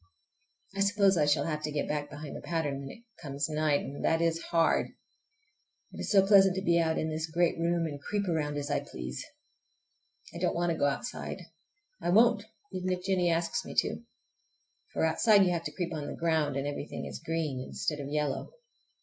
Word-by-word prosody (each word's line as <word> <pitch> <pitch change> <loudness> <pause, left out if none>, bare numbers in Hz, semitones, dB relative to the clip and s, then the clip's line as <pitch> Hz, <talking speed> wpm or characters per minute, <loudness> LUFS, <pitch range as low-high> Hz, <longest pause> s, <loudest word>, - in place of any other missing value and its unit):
I - - -4
suppose 200 -1 +4
I 150 -3 +3
shall 145 -1 +3
have 155 -2 -2
to 155 0 -3
get 145 -1 -1
back 145 -1 -2
behind 150 -1 -8
the - - -7
pattern 155 -5 -2
when 135 -1 -7
it 230 - -12 0.2
comes 140 -2 -2
night, 155 -2 +1
and 140 +1 -7
that 160 - +3
is 165 0 +1
hard! 165 -1 +2 1.0
It - - -10
is - - -3
so 195 -2 +6
pleasant 195 -2 +6
to 190 - -2
be 170 -2 +3
out 160 -1 +1
in 160 - -1
this 160 +1 -3
great 170 +1 +1
room 170 0 +1
and 145 -3 -5
creep 205 +3 -2
around 150 -4 -1
as 145 0 -3
I 145 - +2
please! 65 0 -6 1.1
I 170 - -6
don't 180 0 0
want 175 0 +1
to 165 - -2
go - - +3
outside. 145 +11 -3 0.6
I - - -1
won't, 225 +2 +5 0.3
even 185 0 -2
if 180 0 -2
Jennie 185 -2 +2
asks 165 0 0
me - - -8
to. - - +1 0.9
For - - +1
outside 200 +5 +5
you 180 - +2
have 170 -1 -2
to - - -3
creep 175 -2 -3
on 150 -2 -4
the - - -5
ground, 160 -4 +1
and 140 0 -1
everything 145 +1 -4
is - - -7
green 155 -6 -2
instead 150 +3 -3
of 140 -1 -5
yellow. 150 - -2
165 Hz, 210 wpm, -30 LUFS, 145-180 Hz, 1.1 s, so